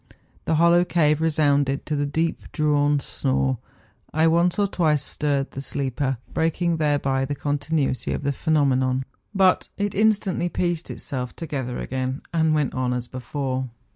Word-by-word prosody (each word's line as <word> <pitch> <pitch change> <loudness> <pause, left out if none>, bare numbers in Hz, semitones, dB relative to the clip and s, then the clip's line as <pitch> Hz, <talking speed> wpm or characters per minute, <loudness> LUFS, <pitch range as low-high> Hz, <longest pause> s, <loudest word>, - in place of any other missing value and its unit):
The 160 - +1
hollow 170 +2 +5
cave 155 -4 +2
resounded 145 -3 +2
to 155 - -1
the 145 0 0
deep 160 +3 -2
drawn 145 -1 +2
snore. 65 - -1 0.5
I 155 +1 +2
once 170 +3 +3
or 205 - +3
twice 155 -7 +1
stirred 140 -2 -1
the 135 - -6
sleeper, 135 -1 -2 0.2
breaking 165 +1 +1
thereby 145 -3 +1
the 145 +2 -3
continuity 145 -2 -1
of - - -3
the 140 - +1
phenomenon; 130 -3 +1 0.3
but 190 -1 +3
it 205 -1 -1
instantly 200 -4 +2
pieced 175 -2 -2
itself 125 -4 -5
together 135 -7 -4
again, 130 +1 -3
and 160 -2 +3
went 150 -3 0
on 130 -1 0
as 125 -1 -3
before. 130 +1 -3
145 Hz, 150 wpm, -24 LUFS, 135-165 Hz, 0.5 s, hollow